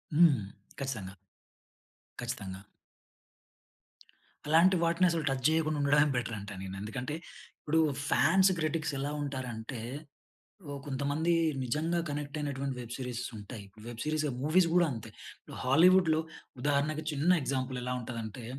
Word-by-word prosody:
హ్మ్. 155 -6 +6 0.4
ఖచ్చితంగా. 115 -9 -4 1.1
ఖచ్చితంగా. 95 0 -5 1.9
అలాంటి 165 +5 +6
వాటిని 170 +2 +3
అసలు 165 -2 -1
టచ్ 135 -1 -2
చేయకుండా 155 -1 +1
ఉండడమే 145 +1 +4
బెటరంటాను 105 -5 -4
నేను. 95 0 -6
ఎందుకంటే, 125 +7 -4 0.5
ఇప్పుడు, 160 +2 +1 0.3
ఫ్యాన్స్ 190 +5 +5
క్రిటిక్స్ 155 -1 -1
ఎలా 140 +2 -2
ఉంటారంటే, 125 -4 -5 0.9
ఓ - - -4
కొంతమంది 145 +4 0 0.3
నిజంగా 155 +7 0
కనెక్ట్ 145 +1 -4
అయినటువంటి 140 -2 -2
వెబ్ 120 0 -7
సీరీస్ 125 -2 -4
ఉంటాయి. 105 0 -8 0.2
వెబ్ 120 -1 -7
సీరీస్, 155 0 0 0.2
మూవీస్ 170 +4 +4
కూడా 175 -1 +6
అంతే, 115 -4 -6 0.3
ఇప్పుడు - - -12
హాలీవుడ్‌లో 160 +4 +5 0.4
ఉదాహరణకు 145 +3 +1
చిన్న 150 +4 +1
ఎగ్జాంపుల్, 130 -1 -2
ఎలా 125 0 -2
ఉంటదంటే, 115 -1 -6
140 Hz, 120 wpm, -31 LUFS, 125-155 Hz, 1.9 s, హ్మ్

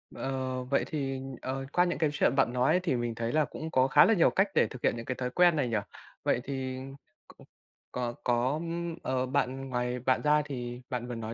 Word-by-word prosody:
Ờ, 130 -1 -3
vậy 135 +2 +1
thì, 135 -3 -3 0.2
ờ, 135 +1 -3
qua 180 - +5
những 175 - -1
cái 155 -2 +2
chuyện 135 - +2
bạn 130 -3 +2
nói 125 +8 +3
thì 160 -8 +1
mình 120 -1 -2
thấy 115 0 -2
là 155 -1 +3
cũng 160 +1 -7
có 130 0 +4
khá - - +7
là 225 - +4
nhiều 170 - +5
cách 195 +2 +2
để - - +4
thực 130 - -10
hiện - - +2
những 115 - -6
cái 130 - -2
thói 125 0 -3
quen 175 +3 +4
này 140 -4 +1
nhỉ. 110 - +1 0.5
Vậy 120 - +1
thì 130 -2 -4 0.5
c - - -42 0.5
có 120 -1 -3
có, 125 +5 +1 0.4
ờ, 130 0 0
bạn 135 0 -1
ngoài 125 0 -1
bạn 130 +1 +1
ra 150 0 +4
thì 125 -3 -5
bạn 125 -1 -3
vừa 120 - -4
nói 115 0 -5
130 Hz, 230 wpm, -29 LUFS, 125-140 Hz, 0.5 s, khá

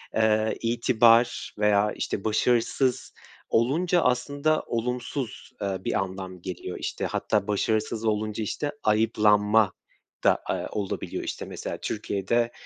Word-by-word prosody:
eee, 110 0 +2
itibar 120 0 +3
veya, 105 0 +3
işte, 100 - -3
başarısız 120 +3 +1 0.4
olunca 165 +10 +2
aslında 145 +4 +1
olumsuz, 125 +1 -3
eee, 100 -2 -1
bir - - -1
anlam 95 -1 -5
geliyor. 90 0 -6
İşte, - - -3
hatta 100 - 0
başarısız 110 +2 0
olunca, 110 0 -1
işte, 145 +7 -2
ayıplanma 105 -1 +3 0.5
da, - - +4
eee, - - -1
olabiliyor. 100 -2 -3
İşte, - - -5
mesela - - -5
Türkiye'de, 115 +5 -1
110 Hz, 115 wpm, -26 LUFS, 105-120 Hz, 0.5 s, da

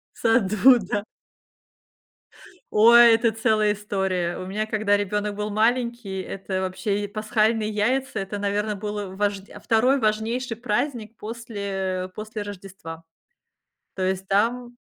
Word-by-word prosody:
В - - -22
саду, 225 +2 +4
да. 205 +1 -3 1.7
Ой, 235 +2 +8
это 230 0 +1
целая 215 -1 +2
история. 190 -4 -2
У 185 - -6
меня, 210 +3 -2
когда 215 -1 +1
ребёнок 205 +1 -2
был 210 +1 -3
маленький, 230 -2 0
это 190 0 -4
вообще 190 +2 -2
и - - -3
пасхальные 215 +1 +1
яйца. 230 +4 0
Это, 195 +1 -4
наверно, 205 +1 -1
было 205 -2 -5
важдя 200 0 -3
а - - -11
2 250 +5 +2
важнейший 225 +3 -1
праздник 230 0 -3
после 200 -5 -4
после 215 0 -6
Рождества. 185 -5 -9 0.9
То 190 - -5
есть, 190 0 -1
там 240 +4 0
210 Hz, 130 wpm, -24 LUFS, 195-225 Hz, 1.7 s, Ой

